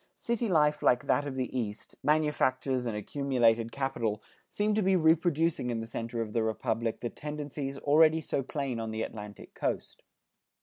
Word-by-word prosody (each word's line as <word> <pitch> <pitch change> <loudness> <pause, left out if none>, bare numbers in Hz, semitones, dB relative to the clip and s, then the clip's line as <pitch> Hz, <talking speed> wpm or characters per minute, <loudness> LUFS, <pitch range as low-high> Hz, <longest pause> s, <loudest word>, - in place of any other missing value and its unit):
City 235 -1 -1
life 150 -3 +3
like 125 0 +3
that 145 - +2
of 135 - -4
the 130 -1 -3
East, 110 -4 -4
manufactures 135 -4 +1
and 110 -2 -2
accumulated 115 -2 +1
capital, 115 -6 -1 0.3
seem 210 +1 0
to 215 - +2
be 190 -1 +3
reproducing 160 -4 +2
in 115 -2 -1
the 115 - -4
center 115 +1 -4
of 105 -1 -8
the 115 - +2
Republic 115 +1 -1
the 120 - -2
tendencies 145 -2 -5
already 155 +3 +5
so 145 - -2
plain 135 -2 -3
on 115 0 -3
the 110 0 -2
Atlantic 105 -2 -8
Coast. - - -3
135 Hz, 170 wpm, -30 LUFS, 115-150 Hz, 0.3 s, already